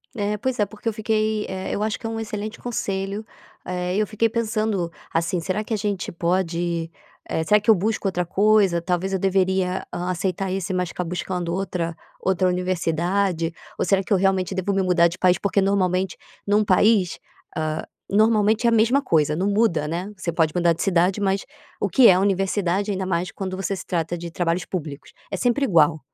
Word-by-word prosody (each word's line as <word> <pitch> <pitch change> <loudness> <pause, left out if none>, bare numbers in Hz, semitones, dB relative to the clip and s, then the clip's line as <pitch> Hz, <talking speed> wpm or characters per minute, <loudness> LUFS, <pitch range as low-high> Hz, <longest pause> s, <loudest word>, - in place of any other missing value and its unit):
É, 210 -1 -1
pois 250 +3 -2
é, 210 - +4
porque 210 +3 -5
eu - - -3
fiquei 215 0 0
eh, 190 0 -4
eu 205 - -1
acho 215 0 -1
que 225 - -5
é - - -3
excelente 215 0 -5
conselho. 200 -3 -3 0.4
Eh, 180 0 -2
eu 210 +1 +1
fiquei 220 +2 +1
pensando, 215 -6 -1 0.2
assim, 170 +2 0
será 190 +5 -2
que 220 - -13
a - - +1
gente 205 -3 -2
pode, 170 -1 -1 0.4
eh 160 - 0
será 210 +6 +4
que 210 - -2
eu 220 - +8
busco 210 +2 -1
outra 180 -2 -1
coisa? 195 -1 +3
Talvez 180 +2 -1
eu 190 - 0
deveria 190 -1 +1
aceitar 185 +2 -2
esse 190 0 -2
mas 180 -1 -1
ficar 180 - -4
buscando 175 0 -3
outra 175 -3 -2 0.2
outra 185 -1 +1
universidade? 180 -1 0 0.2
Ou - - 0
será 195 +1 +3
que - - -14
eu 200 - +5
realmente 190 0 +1
devo 190 +1 -1
me 195 - +2
mudar 180 -2 +4
de 170 +2 -6
país? 180 -1 +4
Porque 200 0 +1
normalmente 190 -2 +1 0.3
num 205 +1 +3
país, 200 -1 +3 0.4
ah, 155 0 -2 0.2
normalmente 215 +1 +3
é - - +6
a - - +2
mesma 230 +5 +3
coisa, 150 - +2
não 185 +5 0
muda, 200 -8 +2
né. 175 +6 -3
Você 180 -2 -3
pode 160 -2 +1
mudar 170 -1 +3
de 165 - -6
cidade 185 +1 +2
mas, 195 0 0 0.3
o - - +1
que 235 +6 +6
é - - +8
a - - +2
universidade 195 0 0
ainda 190 -2 -1
mais 180 0 -1
quando 190 -2 -5
você 195 +1 -2
se - - -8
trata 170 0 -2
de 170 0 -7
trabalhos 170 0 -1
públicos? 150 -6 -6 0.2
É 195 - -3
sempre 245 +7 +1
igual. 160 - +4
190 Hz, 200 wpm, -23 LUFS, 175-205 Hz, 0.4 s, eu